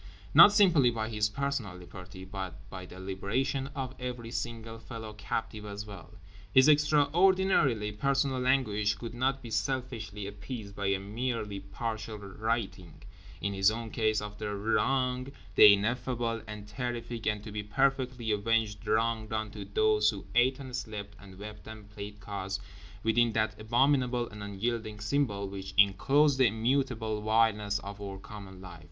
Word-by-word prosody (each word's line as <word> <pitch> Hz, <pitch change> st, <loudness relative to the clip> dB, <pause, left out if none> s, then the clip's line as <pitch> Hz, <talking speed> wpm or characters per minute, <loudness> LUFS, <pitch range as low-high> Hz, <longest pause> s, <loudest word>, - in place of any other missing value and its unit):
Not -, -, +10 dB
simply 175 Hz, -, +5 dB
by 110 Hz, -2 st, -2 dB
his 105 Hz, -2 st, +1 dB
personal 135 Hz, -5 st, -2 dB
liberty, 90 Hz, +1 st, -10 dB
but 95 Hz, -2 st, -7 dB
by 95 Hz, -1 st, -7 dB
the 90 Hz, -, -11 dB
liberation 125 Hz, +9 st, -2 dB
of 130 Hz, -2 st, -4 dB
every 125 Hz, -2 st, -5 dB
single 115 Hz, -2 st, -5 dB
fellow 110 Hz, -2 st, -8 dB
captive 105 Hz, 0 st, -4 dB
as 105 Hz, 0 st, -6 dB
well. 100 Hz, -5 st, -11 dB, 0.4 s
His 130 Hz, +5 st, +6 dB
extraordinarily 150 Hz, -, +4 dB
personal 130 Hz, +3 st, 0 dB
anguish 105 Hz, -6 st, +2 dB
could 115 Hz, -1 st, -7 dB
not 130 Hz, +2 st, 0 dB
be 115 Hz, -, -8 dB
selfishly 115 Hz, -5 st, -2 dB
appeased 100 Hz, +1 st, -7 dB
by 100 Hz, -1 st, -2 dB
a 100 Hz, 0 st, +2 dB
merely 105 Hz, 0 st, -3 dB
partial 110 Hz, +2 st, -5 dB
righting, 100 Hz, -3 st, -4 dB, 0.4 s
in 100 Hz, 0 st, -1 dB
his 95 Hz, 0 st, +4 dB
own 115 Hz, 0 st, -4 dB
case, 110 Hz, -2 st, +1 dB
of 105 Hz, 0 st, -7 dB
the 105 Hz, -1 st, -3 dB
Wrong—the 125 Hz, -2 st, +3 dB
ineffable 115 Hz, +2 st, 0 dB
and 105 Hz, -1 st, -8 dB
terrific 115 Hz, +1 st, -4 dB
and 105 Hz, -1 st, 0 dB
to 110 Hz, -, -8 dB
be 105 Hz, 0 st, -3 dB
perfectly 130 Hz, +1 st, 0 dB
avenged 110 Hz, 0 st, 0 dB
Wrong—done 110 Hz, -1 st, 0 dB
to 105 Hz, -1 st, -7 dB
those 105 Hz, +1 st, +3 dB
who 100 Hz, -3 st, -5 dB
ate 125 Hz, +2 st, +4 dB
and 130 Hz, -3 st, -7 dB
slept 105 Hz, -4 st, -6 dB
and 95 Hz, -2 st, -13 dB
wept 105 Hz, +2 st, -9 dB
and 110 Hz, -2 st, -10 dB
played 100 Hz, 0 st, -8 dB
cards 100 Hz, -1 st, -4 dB, 0.4 s
within 115 Hz, +1 st, +3 dB
that 110 Hz, -1 st, 0 dB
abominable 125 Hz, +1 st, +2 dB
and 105 Hz, -1 st, -10 dB
unyielding 105 Hz, +2 st, -3 dB
Symbol 105 Hz, -3 st, 0 dB
which 95 Hz, 0 st, -7 dB
enclosed 135 Hz, +9 st, +4 dB
the 130 Hz, -, +6 dB
immutable 110 Hz, -1 st, 0 dB
vileness 105 Hz, -1 st, +2 dB
of 100 Hz, 0 st, -8 dB
our 100 Hz, -1 st, -5 dB
common 95 Hz, -1 st, -10 dB
life. 90 Hz, -3 st, -10 dB
110 Hz, 150 wpm, -30 LUFS, 100-125 Hz, 0.4 s, Not